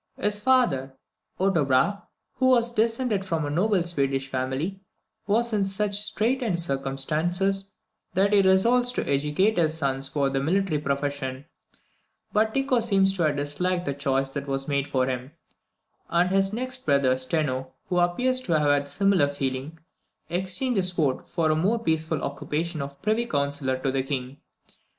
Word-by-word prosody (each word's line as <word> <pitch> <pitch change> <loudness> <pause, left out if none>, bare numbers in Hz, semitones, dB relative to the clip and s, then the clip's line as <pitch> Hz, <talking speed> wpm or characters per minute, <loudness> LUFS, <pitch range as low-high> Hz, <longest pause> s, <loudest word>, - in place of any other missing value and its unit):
His 210 0 +1
father, 210 - +2 0.4
Otto 190 -4 +2
Brahe, 140 +10 +2 0.4
who 260 +1 +2
was 240 -2 +3
descended 225 -2 0
from 165 -5 -2
a 145 - -3
noble 190 +3 +2
Swedish 135 -5 -1
family, 135 +9 -3 0.5
was 230 +3 +1
in 205 -2 +2
such 200 +1 0
straitened 215 0 0
circumstances, 165 +7 -1 0.5
that 200 +2 +3
he 205 - +6
resolved 235 +7 +3
to - - -2
educate 150 +9 +1
his 160 -1 +2
sons 135 -2 -1
for 140 -2 0
the 135 - 0
military 175 +1 +1
profession; 140 -1 -3 0.9
but 220 +1 +2
Tycho 270 -2 +2
seems 195 -4 +3
to 190 - -3
have 155 -3 +2
disliked 175 +6 -1
the 140 - -1
choice 135 -1 -1
that 140 0 -5
was 135 0 -2
made 140 -1 0
for 130 -1 +1
him; 130 +2 -4 0.8
and 175 +2 +2
his 195 0 +2
next 255 +3 -4
brother, 140 -3 +3
Steno, 130 -1 -2
who 180 -1 0
appears 250 +9 +1
to 190 -10 -2
have 150 -1 +3
had 145 0 +2
a - - -13
similar 195 -2 +2
feeling, 140 +2 -4 0.5
exchanged 190 +7 -1
the - - +3
sword 170 -7 -1
for 165 -3 0
the 155 - +2
more 195 +9 +1
peaceful 160 -7 -1
occupation 155 +3 -3
of 140 0 -7
Privy 220 +2 +1
Councillor 140 - -1
to 130 +1 -1
the 135 0 0
King. 135 0 -4
165 Hz, 165 wpm, -25 LUFS, 140-200 Hz, 0.9 s, he